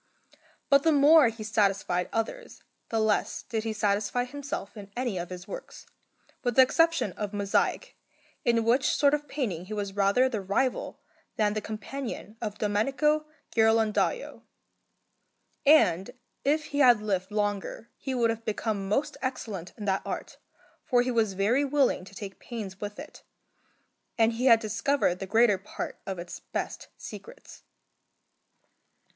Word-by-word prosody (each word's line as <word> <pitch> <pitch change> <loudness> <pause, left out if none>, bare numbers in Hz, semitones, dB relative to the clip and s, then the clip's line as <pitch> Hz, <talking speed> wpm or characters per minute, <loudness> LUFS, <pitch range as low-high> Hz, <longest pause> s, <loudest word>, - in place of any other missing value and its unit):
But 280 0 +5
the 320 - +3
more 295 0 +7
he 225 -1 -5
satisfied 200 -4 +1
others 350 - -4 0.3
the 225 - 0
less 220 -1 0
did 220 -2 -3
he 225 - -2
satisfy 210 +2 0
himself 280 -5 -6
in 200 -2 -9
any 240 -7 -1
of 175 - -5
his 180 +1 -8
works, - - -9 0.6
with 245 -2 0
the 260 - +9
exception 330 - +2
of 205 +2 -5
mosaic, 200 -1 0 0.5
in 235 -1 +2
which 240 +4 +3
sort 285 -1 +4
of 295 0 -1
painting 205 - -3
he 215 +3 -6
was 200 -2 -4
rather 200 +6 +3
the 225 -6 -3
rival 220 +7 -1 0.4
than 210 -1 +2
the 215 - -2
companion 220 +1 -6
of 210 -2 -4
Domenico 275 +9 +1 0.3
Ghirlandajo; 225 - +2 1.3
and 195 - +5 0.3
if 305 +2 +2
he 285 - 0
had 245 -5 +7
lived 195 -3 -2
longer 205 +1 -2
he 265 -2 -4
would 235 -2 +3
have 225 0 -6
become 210 -2 -2
most 270 +8 0
excellent 220 -9 -4
in 210 - -6
that 195 -1 +1
art, - - -6 0.4
for 245 -2 +3
he 250 - -1
was 225 -4 +1
very 215 +9 +2
willing 275 -9 +1
to 195 - -14
take 195 -1 -8
pains 205 -6 -7
with 205 0 -5
it, 300 +2 -10 1.0
and 225 0 +4
he 245 +3 0
had 230 -3 +7
discovered 225 -2 0
the 195 - -5
greater 220 -1 +4
part - - -6
of 190 -1 -3
its 175 0 -7
best - - -5
secrets. - - -11
220 Hz, 150 wpm, -28 LUFS, 200-260 Hz, 1.3 s, the